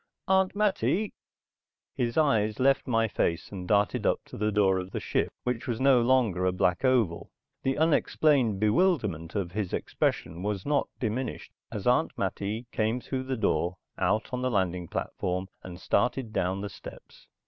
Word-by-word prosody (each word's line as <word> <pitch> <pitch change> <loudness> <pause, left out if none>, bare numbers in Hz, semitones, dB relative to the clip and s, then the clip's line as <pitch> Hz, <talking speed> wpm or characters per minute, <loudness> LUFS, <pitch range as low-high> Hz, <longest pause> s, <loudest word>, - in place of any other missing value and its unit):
Aunt 190 0 +3
Mattie...." 210 0 +1 0.8
His 120 -1 -2
eyes 110 -9 +2
left 135 +2 +3
my 115 -2 +2
face 85 -4 -1
and 90 -3 -6
darted 105 0 +2
up - - +2
to - - -11
the 105 +1 0
door 95 -2 +3
of 90 0 -6
the - - -4
ship - - 0
which 125 +1 -2
was 120 -3 -2
no 130 -2 +5
longer 115 -7 +2
a 95 - +3
black 90 +1 +1
oval. 120 -10 +1 0.3
The 135 +1 0
unexplained 145 -7 +2
bewilderment 105 - +1
of 95 -4 -2
his 100 -2 -3
expression 80 +2 -1
was 100 -1 -2
not 145 -1 +1
diminished 120 +2 -3 0.2
as - - -5
Aunt - - +2
Mattie 105 +4 -2
came 110 +3 0
through 130 +1 -4
the 130 -1 -2
door, 90 -4 0 0.2
out 110 +4 0
on 125 - -1
the 130 - +1
loading 90 -5 0
platform, 90 +4 -3
and 90 -1 -9
started 120 +3 0
down 95 +2 0
the 105 - -4
steps. - - -13
110 Hz, 170 wpm, -28 LUFS, 95-130 Hz, 0.8 s, no